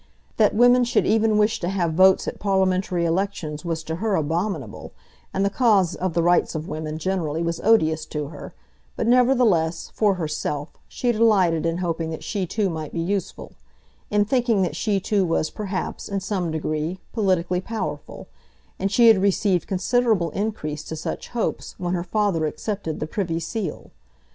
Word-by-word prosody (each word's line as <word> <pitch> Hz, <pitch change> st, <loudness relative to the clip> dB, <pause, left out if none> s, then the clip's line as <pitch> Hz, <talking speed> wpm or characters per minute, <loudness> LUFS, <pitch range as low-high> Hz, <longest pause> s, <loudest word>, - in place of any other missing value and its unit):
That 215 Hz, -2 st, +3 dB
women 245 Hz, +2 st, +6 dB
should 240 Hz, +1 st, +1 dB
even 220 Hz, -1 st, +3 dB
wish 210 Hz, +1 st, +2 dB
to 175 Hz, -, -2 dB
have 175 Hz, -4 st, 0 dB
votes 190 Hz, +3 st, +5 dB
at -, -, -4 dB
parliamentary 190 Hz, -3 st, +1 dB
elections 165 Hz, -3 st, -2 dB
was 165 Hz, -2 st, -3 dB
to 160 Hz, 0 st, -4 dB
her 210 Hz, +1 st, 0 dB
abominable, 160 Hz, -, -3 dB, 0.4 s
and 195 Hz, +1 st, 0 dB
the -, -, +2 dB
cause 205 Hz, -7 st, +3 dB
of 180 Hz, -3 st, -3 dB
the 170 Hz, -, +2 dB
Rights 175 Hz, 0 st, +2 dB
of 155 Hz, +1 st, -4 dB
Women 155 Hz, 0 st, -4 dB
generally 165 Hz, -2 st, -2 dB
was 170 Hz, 0 st, -2 dB
odious 160 Hz, -8 st, +3 dB
to 150 Hz, -2 st, -4 dB
her; 150 Hz, -, -10 dB, 0.4 s
but, -, -, -2 dB
nevertheless, 235 Hz, -10 st, +3 dB
for 205 Hz, -3 st, +2 dB
herself, 150 Hz, -3 st, -3 dB, 0.2 s
she 245 Hz, -, -1 dB
delighted 195 Hz, -8 st, +3 dB
in 165 Hz, 0 st, -1 dB
hoping 165 Hz, -2 st, -2 dB
that 160 Hz, -, -6 dB
she 195 Hz, -3 st, -2 dB
too 210 Hz, +3 st, 0 dB
might 160 Hz, -4 st, -5 dB
be -, -, -2 dB
useful, 190 Hz, +2 st, -3 dB, 0.6 s
in 210 Hz, 0 st, +2 dB
thinking 235 Hz, -4 st, +2 dB
that 175 Hz, -, -2 dB
she 205 Hz, -3 st, 0 dB
too 200 Hz, +1 st, +1 dB
was 165 Hz, -3 st, 0 dB
perhaps, 195 Hz, -3 st, -4 dB
in 200 Hz, -1 st, -1 dB
some 190 Hz, -3 st, -2 dB
degree, 155 Hz, +2 st, -2 dB, 0.2 s
politically 185 Hz, -4 st, +1 dB
powerful; 155 Hz, -9 st, -5 dB, 0.5 s
and 195 Hz, +1 st, -1 dB
she 235 Hz, +3 st, +5 dB
had 220 Hz, -4 st, +6 dB
received 195 Hz, -2 st, +1 dB
considerable 200 Hz, -1 st, +1 dB
increase 155 Hz, -8 st, -3 dB
to 160 Hz, -, -5 dB
such 160 Hz, -, -5 dB
hopes 235 Hz, -2 st, -3 dB
when 180 Hz, -1 st, -2 dB
her 175 Hz, -1 st, -1 dB
father 185 Hz, -4 st, 0 dB
accepted 195 Hz, -1 st, -4 dB
the -, -, -2 dB
Privy 165 Hz, 0 st, -2 dB
Seal. 185 Hz, 0 st, -5 dB
185 Hz, 175 wpm, -23 LUFS, 160-210 Hz, 0.6 s, women